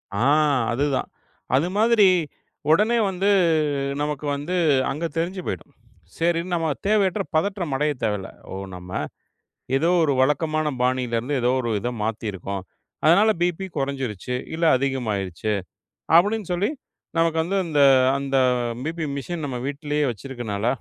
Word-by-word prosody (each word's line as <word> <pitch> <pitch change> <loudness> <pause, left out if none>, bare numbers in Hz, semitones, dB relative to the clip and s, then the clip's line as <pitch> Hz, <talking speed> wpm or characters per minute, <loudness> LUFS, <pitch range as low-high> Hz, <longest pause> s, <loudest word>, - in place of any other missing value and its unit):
ஆ, - - -1 0.5
அது 135 +5 +1
தான். - - -2 0.5
அது 145 +6 +2
மாதிரி 220 -2 +5 0.6
உடனே 215 +8 +4
வந்து, 190 +2 0 0.7
நமக்கு 150 0 -3
வந்து 145 +6 -4 0.4
அங்க 155 +4 -4
தெரிஞ்சு 185 +3 -2
போயிடும். 145 - -5 0.5
சரின்னு 170 +2 0
நம்ம 165 -2 0 0.2
தேவையற்ற 205 -1 +2
பதற்றமடைய 155 -5 0
தேவையில்ல. 105 -3 -1 0.2
ஓ! - - -5 0.2
நம்ம 90 0 -10 0.9
ஏதோ 160 +5 +2
ஒரு 145 - +2
வழக்கமான 155 +2 +1
பாணியில 125 -2 0
இருந்து, 135 +5 -3
ஏதோ 120 +1 +2
ஒரு 120 - -3
இத 120 - -2
மாத்தி 110 +1 -3
இருக்கோம். 95 +1 -5 0.4
அதனால 195 +8 +6
பிபி 175 +2 0
கொறஞ்சுருச்சு 130 -5 -3 0.2
இல்ல 165 +1 0
அதிகமாயிருச்சு 110 -8 -2 0.7
அப்டின்னு 205 +3 +3
சொல்லி 180 +3 +1 0.5
நமக்கு 165 -1 +2
அந்த 170 -4 0 0.4
அந்த 140 -1 -1 0.5
பிபி 160 +1 -3
மெஷின் 160 +4 -4
நம்ம 135 -3 -3
வீட்லயே 145 +1 -1
வச்சிருக்கனால 115 -2 -5
150 Hz, 125 wpm, -23 LUFS, 125-175 Hz, 0.9 s, அதனால